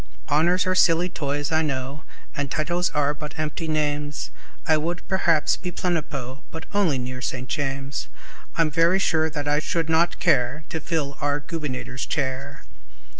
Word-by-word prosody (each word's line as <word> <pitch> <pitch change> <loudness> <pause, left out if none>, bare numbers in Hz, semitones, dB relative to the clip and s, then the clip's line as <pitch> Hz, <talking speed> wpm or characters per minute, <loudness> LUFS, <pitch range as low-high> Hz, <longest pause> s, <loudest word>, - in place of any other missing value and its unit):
Honors 170 +5 +4
are 185 - +2
silly 175 -1 +4
toys, 145 -2 -2
I 160 0 +4
know, 140 -1 -2 0.3
And 145 -1 -1
titles 175 +5 +1
are 145 0 +1
but 150 0 -7
empty 155 +1 -2
names; 150 -1 -1 0.3
I 160 - +5
would, 170 +3 -2
perhaps, 170 -5 +3
be 180 -1 -4
Plenipo, 145 -7 -2
But 160 0 -7
only 190 -9 +3
near 130 0 -4
St. 125 0 -3
James; 135 0 -2 0.5
I'm 165 -2 +3
very 165 +5 +4
sure 160 -4 +2
I 145 0 +1
should 165 +1 -1
not 165 +2 +3
care 140 -2 +2
To 160 - -2
fill 150 -4 -2
our 145 0 +1
Gubernator's 130 -6 -4
chair. 140 -1 -2
150 Hz, 155 wpm, -25 LUFS, 140-165 Hz, 0.5 s, I